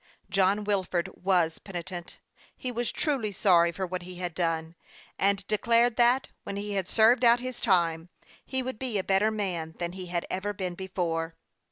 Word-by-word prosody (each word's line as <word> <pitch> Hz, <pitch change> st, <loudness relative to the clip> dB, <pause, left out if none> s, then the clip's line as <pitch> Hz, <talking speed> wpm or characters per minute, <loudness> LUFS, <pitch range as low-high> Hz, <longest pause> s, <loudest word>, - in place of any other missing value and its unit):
John 195 Hz, +2 st, +3 dB
Wilford 190 Hz, -4 st, -1 dB
was 175 Hz, -4 st, +1 dB
penitent; 175 Hz, -2 st, -7 dB, 0.4 s
he 255 Hz, -, -3 dB
was 240 Hz, 0 st, -2 dB
truly 265 Hz, -9 st, 0 dB
sorry 175 Hz, -3 st, +4 dB
for 190 Hz, +3 st, -3 dB
what 180 Hz, 0 st, -4 dB
he 180 Hz, +1 st, -9 dB
had 175 Hz, -1 st, -4 dB
done, 165 Hz, -1 st, -1 dB, 0.5 s
and 195 Hz, -1 st, +2 dB
declared 230 Hz, +3 st, +3 dB
that, 245 Hz, +2 st, +4 dB
when 200 Hz, -, -5 dB
he 205 Hz, +1 st, -4 dB
had 190 Hz, -3 st, -2 dB
served 230 Hz, +3 st, +5 dB
out 235 Hz, 0 st, +7 dB
his 255 Hz, 0 st, -5 dB
time, 170 Hz, -5 st, +2 dB, 0.3 s
he 260 Hz, -1 st, -2 dB
would 255 Hz, -3 st, -5 dB
be 250 Hz, -5 st, -1 dB
a 190 Hz, -, 0 dB
better 195 Hz, +3 st, +3 dB
man 180 Hz, -7 st, -3 dB
than 175 Hz, -1 st, -3 dB
he 185 Hz, 0 st, -7 dB
had 175 Hz, -1 st, -2 dB
ever 205 Hz, +2 st, -3 dB
been 185 Hz, -3 st, -3 dB
before. 170 Hz, -3 st, -3 dB
190 Hz, 180 wpm, -28 LUFS, 175-220 Hz, 0.5 s, out